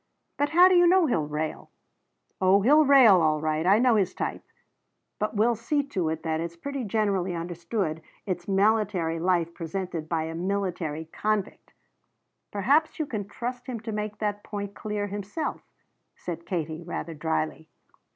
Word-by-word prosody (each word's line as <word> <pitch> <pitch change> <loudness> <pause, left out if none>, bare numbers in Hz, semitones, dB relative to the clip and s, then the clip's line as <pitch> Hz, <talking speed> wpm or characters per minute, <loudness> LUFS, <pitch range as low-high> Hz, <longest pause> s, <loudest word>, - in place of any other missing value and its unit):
"But 290 0 0
how 355 +3 +7
do 375 - +4
you 350 -1 +6
know 365 0 +5
he'll 165 - 0
rail?" 150 +1 -4 0.7
"Oh 190 +1 +4
he'll 300 +6 +6
rail, 250 -10 +7
all 155 -1 +2
right. 155 +2 -1
I 195 +2 +6
know 240 -1 +4
his 190 -3 0
type. - - -3 0.8
But 210 +1 -2
we'll 225 +3 +3
see 260 +6 -1
to 180 - -1
it 160 0 -4
that 160 -1 -1
it's 170 +1 -4
pretty 275 +4 -4
generally 200 -4 0
understood 170 0 -3 0.2
it's 180 -3 -4
military 195 -4 +1
life 170 -1 +1
as - - -23
presented 170 -2 -5
by 165 -2 0
a 160 0 -5
military 175 -3 -2
convict." 210 +4 -3 0.8
"Perhaps 280 +10 +2
you 310 - -1
can 215 -8 -4
trust 245 +3 -6
him 245 -3 -4
to 220 0 -5
make 210 0 -4
that 205 -1 -2
point 200 -1 -5
clear 210 -1 -3
himself," 205 +9 -4 0.5
said 170 -1 -7
Katie 160 -3 -3
rather 165 -1 -5
dryly. 160 0 -2
195 Hz, 165 wpm, -26 LUFS, 165-220 Hz, 0.8 s, how